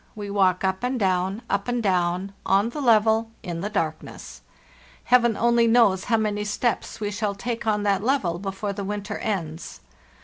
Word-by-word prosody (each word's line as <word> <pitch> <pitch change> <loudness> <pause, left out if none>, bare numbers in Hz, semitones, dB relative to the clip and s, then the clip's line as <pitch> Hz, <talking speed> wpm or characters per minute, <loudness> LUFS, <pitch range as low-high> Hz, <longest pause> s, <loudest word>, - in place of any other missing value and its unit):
We 205 -2 -6
walk 190 -2 +2
up 190 +3 -1
and 250 0 -1
down, 190 +2 0
up 200 +2 -1
and 245 0 0
down, 185 0 0
on 200 +4 +2
the 290 +5 -5
level, 225 -2 +3
in 170 -1 -4
the 205 - -2
darkness. 160 -6 -4 0.6
Heaven 240 -3 +3
only 235 0 +3
knows 225 -5 +4
how 225 - +2
many 210 -1 -1
steps 210 +1 -2
we 205 -1 -2
shall 205 -1 -2
take 230 +2 -4
on 210 -1 +1
that 200 -1 +1
level 210 -10 0
before 195 +1 -4
the 200 0 -5
winter 205 +1 -4
ends. 165 -6 -4
205 Hz, 175 wpm, -24 LUFS, 190-225 Hz, 0.6 s, knows